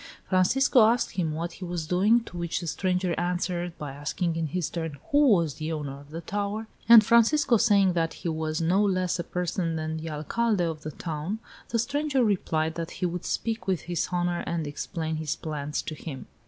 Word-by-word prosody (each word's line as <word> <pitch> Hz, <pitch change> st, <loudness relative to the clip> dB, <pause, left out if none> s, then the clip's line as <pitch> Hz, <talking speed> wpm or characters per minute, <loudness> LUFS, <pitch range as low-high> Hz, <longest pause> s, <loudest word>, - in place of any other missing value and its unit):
Francisco 235 Hz, +8 st, +4 dB
asked 235 Hz, +1 st, +1 dB
him 170 Hz, -4 st, -1 dB
what 170 Hz, +2 st, -3 dB
he 185 Hz, -, -10 dB
was 175 Hz, -2 st, -3 dB
doing, 200 Hz, +8 st, +3 dB
to 180 Hz, -, -12 dB
which 170 Hz, -1 st, -2 dB
the -, -, -6 dB
stranger 180 Hz, +1 st, 0 dB
answered 175 Hz, 0 st, -2 dB
by 150 Hz, -2 st, -5 dB
asking 155 Hz, +4 st, -2 dB
in 165 Hz, -1 st, -1 dB
his 175 Hz, +2 st, -2 dB
turn 160 Hz, -4 st, -4 dB
who 290 Hz, 0 st, +5 dB
was 170 Hz, -, +3 dB
the 155 Hz, +2 st, -4 dB
owner 145 Hz, -3 st, -4 dB
of 145 Hz, 0 st, -15 dB
the 165 Hz, +2 st, -6 dB
tower, 205 Hz, +5 st, -3 dB, 0.2 s
and 230 Hz, -2 st, +10 dB
Francisco 235 Hz, +4 st, +4 dB
saying 200 Hz, -4 st, +4 dB
that 165 Hz, -1 st, 0 dB
he -, -, -6 dB
was 155 Hz, -1 st, -1 dB
no 180 Hz, +5 st, +3 dB
less 185 Hz, -3 st, +1 dB
a -, -, -1 dB
person 175 Hz, -1 st, -2 dB
than 160 Hz, 0 st, -3 dB
the 160 Hz, +1 st, -5 dB
Alcalde 185 Hz, +7 st, 0 dB
of 160 Hz, -2 st, -4 dB
the 155 Hz, -, -5 dB
town, 160 Hz, +5 st, -4 dB, 0.3 s
the 235 Hz, -, 0 dB
stranger 285 Hz, +2 st, +1 dB
replied 160 Hz, -7 st, 0 dB
that 165 Hz, 0 st, -4 dB
he -, -, -1 dB
would 175 Hz, 0 st, -3 dB
speak 225 Hz, -4 st, -2 dB
with 185 Hz, -5 st, +1 dB
his 175 Hz, -1 st, -2 dB
honor 175 Hz, -1 st, 0 dB
and 165 Hz, -2 st, -1 dB
explain 160 Hz, +2 st, -4 dB
his 155 Hz, -2 st, -2 dB
plans 150 Hz, -1 st, -4 dB
to -, -, -5 dB
him. 145 Hz, -3 st, -7 dB
175 Hz, 205 wpm, -27 LUFS, 160-200 Hz, 0.3 s, and